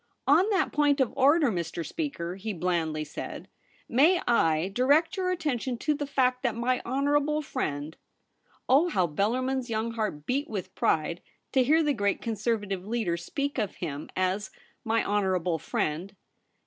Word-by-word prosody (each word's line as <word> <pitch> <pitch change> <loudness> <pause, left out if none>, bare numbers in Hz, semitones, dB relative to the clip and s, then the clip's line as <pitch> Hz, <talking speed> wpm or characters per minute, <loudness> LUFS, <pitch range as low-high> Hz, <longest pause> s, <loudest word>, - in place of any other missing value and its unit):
'On 330 +9 +5
that 390 -3 +1
point 290 -1 +2
of 260 -4 +1
order, 280 0 +4
Mr. 170 -2 -3
Speaker,' 185 - -4
he 205 +3 -4
blandly 165 -3 -1
said, 150 - -7 0.2
* - - -32
may 315 +9 +4
I 165 -7 +3
direct 285 - +3
your 370 -1 -1
attention 275 -8 -1
to 300 +6 0
the 290 -1 -4
fact 255 -2 +1
that 240 -5 0
my 245 +2 0
honourable 290 +4 +1
friend 155 - -3 0.2
' - - -48
— - - -35
oh, 290 +7 +4
how 185 - +2
Bellarmin's 245 - -1
young 225 +1 -1
heart 215 -10 -3
beat 280 +4 -1
with 200 -5 -5
pride 165 +2 0 0.3
to 265 - +4
hear 315 +5 +4
the 295 -1 +2
great 205 -4 0
Conservative 210 -4 -2
leader 215 -4 -1
speak 280 - -3
of 210 -4 -2
him 150 -4 -5
as 185 +3 0 0.2
' - - -37
my 225 0 +1
honourable 185 -5 0
friend 170 +9 -2
230 Hz, 170 wpm, -28 LUFS, 185-280 Hz, 0.3 s, On